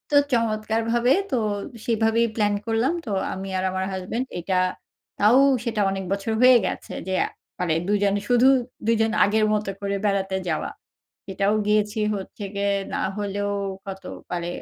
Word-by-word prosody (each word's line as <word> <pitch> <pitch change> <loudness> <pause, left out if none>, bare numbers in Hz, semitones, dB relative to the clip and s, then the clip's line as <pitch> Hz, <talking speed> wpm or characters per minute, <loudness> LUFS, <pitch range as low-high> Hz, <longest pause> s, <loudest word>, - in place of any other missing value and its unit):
তো - - +7 0.2
চমৎকারভাবে 230 +1 +1 0.2
তো - - +2 0.5
সেভাবেই 230 0 +2
প্লান 210 -2 +2
করলাম। 230 +6 +1
তো - - -6 0.2
আমি 190 +1 -6
আর 185 - -1
আমার 190 0 -2
হাসব্যান্ড 195 +7 -3
এটা 185 +2 -2 0.6
তাও 220 +6 +5 0.2
সেটা 225 -3 -1
অনেক 195 0 -3
বছর 200 +3 -1
হয়ে 255 0 +8
গেছে, - - -4
যে 190 - -1 0.5
মানে 175 -3 +1
দুজন 205 -1 +2
শুধু 245 +1 +5 0.4
দুজন 225 -1 +3
আগের 215 +2 +3
মত 210 0 0 0.2
করে 200 0 -1
বেড়াতে 195 -1 0
যাওয়া। 155 - -1 0.6
এটাও 195 +2 +1
গিয়েছি 210 +1 +1 0.2
হচ্ছে 200 +2 -7
গিয়ে 200 0 0 0.2
না - - -1 0.2
হলেও 205 0 -2 0.3
কত 195 -1 -7 0.3
মানে 175 -1 -2
210 Hz, 150 wpm, -24 LUFS, 195-225 Hz, 0.6 s, হয়ে